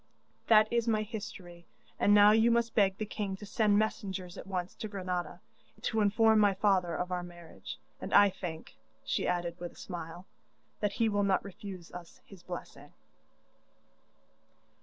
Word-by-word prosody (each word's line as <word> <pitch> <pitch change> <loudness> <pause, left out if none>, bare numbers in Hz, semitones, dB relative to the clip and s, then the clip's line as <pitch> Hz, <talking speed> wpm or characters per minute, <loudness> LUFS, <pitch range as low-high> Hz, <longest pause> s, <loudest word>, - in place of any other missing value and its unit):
'That 215 -1 +6
is 235 0 +1
my 215 -2 +2
history, 185 -6 -8 0.3
and 205 - +3
now 205 0 +8
you 225 +2 +4
must 235 -1 +1
beg 195 -3 +3
the 215 - -3
king 205 -2 -4
to 205 - -10
send 205 0 +2
messengers 195 -4 -2
at - - -9
once 185 -2 -3
to 215 - -6
Granada, 180 -4 -4 0.4
to 220 -2 0
inform 220 +1 +4
my 205 -2 +4
father 185 -4 +2
of 180 +2 -3
our 180 -1 -1
marriage, 175 -2 -10 0.2
and - - -6
I 205 -1 +6
think,' 165 -4 -7 0.3
she - - -1
added 175 -1 -2
with 175 0 -6
a - - -23
smile, 175 0 -8 0.5
'that 205 -1 -1
he 230 - +1
will 205 -1 +1
not 195 -1 +1
refuse 190 -3 -9
us 175 -1 -11
his 195 -3 -14
blessing. 175 0 -9
195 Hz, 165 wpm, -31 LUFS, 180-215 Hz, 0.5 s, now